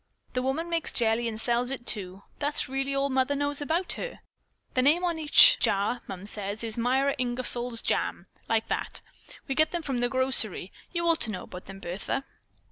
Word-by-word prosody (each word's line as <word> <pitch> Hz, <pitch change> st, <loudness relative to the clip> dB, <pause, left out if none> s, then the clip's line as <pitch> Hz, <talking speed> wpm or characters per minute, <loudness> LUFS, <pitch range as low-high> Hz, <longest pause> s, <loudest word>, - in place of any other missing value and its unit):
The 250 Hz, -, 0 dB
woman 270 Hz, +6 st, -1 dB
makes 335 Hz, -2 st, -1 dB
jelly 230 Hz, 0 st, +1 dB
and 220 Hz, -1 st, -4 dB
sells 240 Hz, +2 st, 0 dB
it, 265 Hz, -3 st, -4 dB
too. 195 Hz, -2 st, -2 dB, 0.2 s
That's 290 Hz, 0 st, 0 dB
really 270 Hz, +1 st, -2 dB
all 275 Hz, 0 st, 0 dB
Mother 260 Hz, +2 st, +1 dB
knows 285 Hz, 0 st, -1 dB
about 330 Hz, +5 st, 0 dB
her. -, -, -6 dB, 0.5 s
The 255 Hz, -, +3 dB
name 305 Hz, +7 st, +4 dB
is -, -, +2 dB
on 335 Hz, -2 st, -2 dB
each 315 Hz, +11 st, +7 dB
jar, 205 Hz, +5 st, +1 dB
Mums 195 Hz, +3 st, -4 dB
says. 205 Hz, +1 st, -2 dB
'Myra 260 Hz, +4 st, +1 dB
Ingersol's 245 Hz, -1 st, +1 dB
Jams,' -, -, -1 dB, 0.2 s
like 225 Hz, 0 st, +1 dB
that. -, -, -2 dB, 0.4 s
We 270 Hz, -, -1 dB
get 310 Hz, +3 st, +3 dB
them 345 Hz, -2 st, -3 dB
from 270 Hz, -5 st, -2 dB
the 245 Hz, 0 st, +1 dB
grocery. 260 Hz, -8 st, 0 dB, 0.2 s
You 340 Hz, -1 st, -1 dB
ought 335 Hz, -1 st, +3 dB
to 220 Hz, -, -1 dB
know 185 Hz, -, -5 dB
about 180 Hz, 0 st, -10 dB
them, 195 Hz, 0 st, -9 dB
Bertha." 195 Hz, +9 st, -3 dB
255 Hz, 195 wpm, -28 LUFS, 225-285 Hz, 0.5 s, each